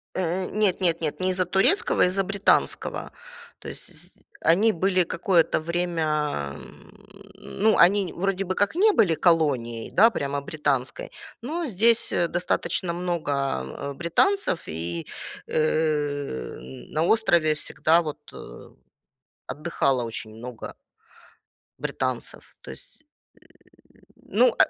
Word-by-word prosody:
Э, 185 +1 -1
нет 205 -3 +1
нет 170 -2 +2
нет, 155 -2 -2
не 185 0 +1
из-за 185 0 +1
турецкого, 190 - +2
из-за 190 +2 +1
британского. 200 +1 0 0.5
То - - -8
есть - - -11 0.3
они 205 +7 +4
были 185 0 +2
какое-то 170 0 +1
время. 155 - -2 0.8
Ну, 215 +2 0
они, 190 +1 +4
н - - -14
вроде 195 +1 -1
бы 185 0 -3
как 205 +8 0
не 420 +5 +5
были 190 - +3
колонией, 140 -10 +1
да, 225 +4 +6
прямо 140 -9 -3
британской, 140 -3 -2 0.3
но 320 +8 -3
здесь 230 +2 +3 0.2
достаточно 175 0 -1
много 140 - -3
британцев. 180 - +1
И, 85 +1 -4 0.4
э, 145 - -1
на 65 - -5
острове 170 -6 +3
всегда, 155 +3 +2
вот, 155 -3 -5 1.3
отдыхало 140 -5 -1
очень 115 -1 -6
много 120 +1 -8 1.1
британцев, - - -4
то - - -9
есть, - - -14 0.9
э - - -24 0.2
Ну, - - +1
170 Hz, 110 wpm, -25 LUFS, 145-190 Hz, 1.3 s, да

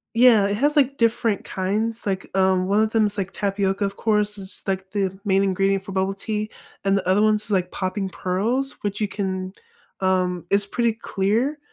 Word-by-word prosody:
Yeah, 230 -4 +6
it 200 - 0
has, 290 +6 +2
like, 275 -1 +3
different 230 -2 +1
kinds. 215 +5 -2
Like, 195 -1 -2
um, 190 -1 +3
one 200 +2 +3
of 220 0 +1
them 220 -2 +4
is, 205 0 -4
like, 195 -1 -2
tapioca, 195 0 0
of 200 0 -3
course. 210 -1 0
It's, 190 0 -10
like, 190 -1 -2
the 195 -2 -1
main 195 -1 +3
ingredient 195 0 +1
for 195 - -7
bubble 190 +1 0
tea, 215 +1 -3 0.3
and 195 0 +3
the 195 - -2
other 190 +2 +3
one's, 215 0 +1
like, 185 -3 +1
popping 190 +1 -2
pearls, 225 +10 -1
which 205 0 -3
you 210 - +1
can 190 -2 -3 0.5
um, 180 -2 0
is 200 +1 +3
pretty 235 +3 0
clear, 230 +7 0
200 Hz, 195 wpm, -23 LUFS, 190-215 Hz, 0.5 s, Yeah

